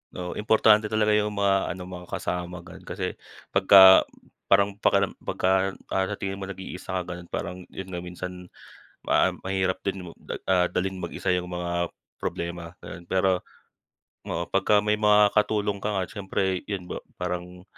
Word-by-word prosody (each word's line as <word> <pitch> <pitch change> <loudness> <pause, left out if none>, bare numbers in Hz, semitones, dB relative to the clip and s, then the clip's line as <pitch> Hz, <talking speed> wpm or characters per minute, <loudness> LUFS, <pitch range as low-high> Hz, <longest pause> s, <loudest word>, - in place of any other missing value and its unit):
Oo, 90 0 -5
importante 110 0 +4
talaga 105 0 +2
yung 105 0 +1
mga 100 -1 +2
ano, 95 - -8
mga 90 -1 -9
kasama, 90 0 -4
ganun. 95 - -13
Kasi - - -3 0.4
pagka 95 -1 +8 0.4
parang 100 0 +3
pakiram 100 -1 +3
pagka, 95 +1 +1 0.2
ah, 95 0 +1
sa 105 - -3
tingin 100 0 -4
mo 95 - -5
nag-iisa 95 -1 -5
ka, 90 - -8
ganun, 90 0 -8
parang, 90 +2 -5
yun 95 0 -8
nga, 90 - -3
minsan 90 +1 -7 0.6
ma - - +2
mahirap 95 -1 -1
din, 95 -2 -3 0.4
ah, 90 -1 +3
dalhin 95 +1 -1
mag-isa 85 - -6
yung 90 0 -3
mga 85 0 -2 0.3
problema, 85 0 -4
gano'n. 85 - -9
Pero, 95 +1 +1 0.9
oo, 85 - -2
pagka 105 +2 +3
may 105 0 +1
mga 105 -1 +5
katulong 105 -2 +1
ka - - -2
nga 95 - 0
siyempre, 95 -2 -2
'yon 100 -3 -3
ba, - - -6 0.2
parang 90 0 -5
95 Hz, 160 wpm, -26 LUFS, 90-100 Hz, 0.9 s, pagka